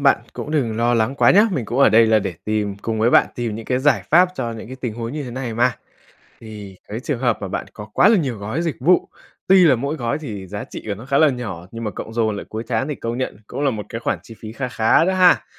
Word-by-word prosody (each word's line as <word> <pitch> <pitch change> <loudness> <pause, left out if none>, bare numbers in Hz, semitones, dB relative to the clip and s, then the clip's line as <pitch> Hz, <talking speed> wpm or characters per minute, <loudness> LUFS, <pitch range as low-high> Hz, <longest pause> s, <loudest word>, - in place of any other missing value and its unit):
bạn 140 -1 +4
cũng - - -6
đừng 125 -8 0
lo 120 +1 +2
lắng 115 +4 +1
quá - - +4
nhá, 205 +3 +6
mình 130 -10 -2
cũng 120 +5 -3
ở 140 - +7
đây 115 +1 +5
là 110 -1 +4
để 95 -4 -4
tìm 105 -2 -1
cùng 110 +2 -3
với 115 +2 +3
bạn - - +5
tìm 115 -3 -3
những 115 0 -7
cái 125 -1 0
giải 145 +2 +2
pháp 180 +3 +6
cho 115 -7 -3
những 115 -1 -8
cái 130 +3 -9
tình 120 -4 -4
huống 115 +2 -5
như 150 - -4
thế 125 - -7
này 120 -2 -4
mà. 120 0 +2 0.7
Thì 105 -4 -10
cái 110 +2 -5
trường 130 0 -3
hợp 120 -3 +1
mà 100 - -3
bạn 95 - -4
có 105 - -8
quá 200 - +5
là 220 -1 +5
nhiều 130 - -2
gói 110 +10 -3
dịch 165 -4 -2
vụ, 175 +8 +3 0.4
tuy 185 -2 +6
là 140 - +5
mỗi 140 +6 -3
gói 120 0 -2
thì 105 -11 -7
giá 100 +2 -5
trị - - -9
của 100 - -2
nó 115 - -11
khá 140 0 +1
là 155 -2 +6
nhỏ, 100 -9 -5
nhưng 115 0 -7
mà 105 - -2
cộng 110 - -8
dồn 110 -2 0
lại 100 - -6
cuối 110 +1 -5
tháng 125 +4 -1
thì 150 - -3
công 115 +1 -4
nhận 130 - -3
cũng - - -5
là 140 -2 +2
một 105 -3 -5
cái 115 - -5
khoản 110 -5 -2
chi 115 - -12
phí 110 -1 -8
kha 130 +2 -4
khá 115 +7 +3
đó 190 - +1
ha. 185 -1 +4
120 Hz, 295 wpm, -20 LUFS, 110-140 Hz, 0.7 s, ở